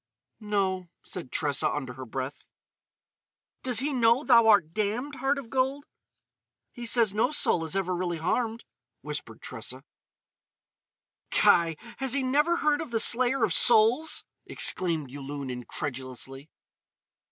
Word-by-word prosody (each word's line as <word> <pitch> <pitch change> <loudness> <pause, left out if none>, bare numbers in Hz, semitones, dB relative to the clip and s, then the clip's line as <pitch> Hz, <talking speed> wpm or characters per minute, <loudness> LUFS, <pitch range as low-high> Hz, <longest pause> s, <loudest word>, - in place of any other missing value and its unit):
"No," 195 -4 -1
said 170 -9 -8
Tressa, 145 -2 0
under 130 -4 -4
her 130 0 -9
breath. 130 +4 -5 1.2
"Does 250 -3 0
he 290 +1 -1
know 235 +1 +3
thou 235 -5 +5
art 195 -7 +4
damned, 235 +7 -2
heart 275 +1 0
of 255 -5 -8
gold?" 270 +2 0 0.9
"He 240 -2 -7
says 230 -4 +3
no 220 +4 +2
soul 235 - +3
is 160 - -4
ever 185 -2 -1
really 175 -1 -2
harmed," 225 +7 -2 0.4
whispered - - -7
Tressa. - - -8 1.5
"Kai! 165 -2 +3 0.2
Has 265 -2 -1
he 275 -1 0
never 295 +6 +2
heard 300 0 +1
of 320 - -6
the 230 -1 0
Slayer 250 +2 +3
of 200 -7 +2
Souls?" 235 +9 +4 0.2
exclaimed 160 -7 0
Yulun 140 -1 -6
incredulously. 130 +2 -6
210 Hz, 130 wpm, -27 LUFS, 155-255 Hz, 1.5 s, thou